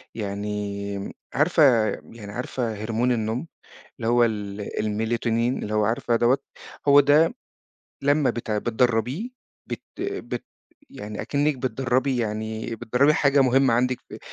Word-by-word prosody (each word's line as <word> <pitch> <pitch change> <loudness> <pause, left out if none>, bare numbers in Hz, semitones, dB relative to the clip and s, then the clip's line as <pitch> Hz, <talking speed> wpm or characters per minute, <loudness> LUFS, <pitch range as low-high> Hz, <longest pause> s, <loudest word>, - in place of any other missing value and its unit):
يعني 100 -1 -4 0.2
عارفة 155 +3 +3 0.5
يعني 105 -3 -9
عارفة 120 +1 -3
هرمون 115 +4 -1
النوم 115 +5 -1 0.5
اللي 115 -2 -2
هو 120 0 +5
ال 105 -3 -3 0.2
الميلاتونين 115 +3 0
اللي 105 - -3
هو 105 0 +3
عارفة 115 +2 +1
دوّة؟ 120 +4 +3 0.5
هو 140 0 +8
ده 145 +3 +4 0.7
لمّا 145 0 +3
بتع 110 -3 -2
بتدرّبيه، 120 - 0 0.4
بت - - -5 0.2
بت 400 +1 -4 0.5
يعني 105 -5 -7
أكنِّك 145 0 0
بتدرّبي 130 +1 0
يعني 110 0 -3
بتدرّبي 130 +7 +3
حاجة 140 -1 +3
مهمة 130 -1 +4
عندِك 125 +1 +1
في - - -9
120 Hz, 125 wpm, -24 LUFS, 110-135 Hz, 0.7 s, هو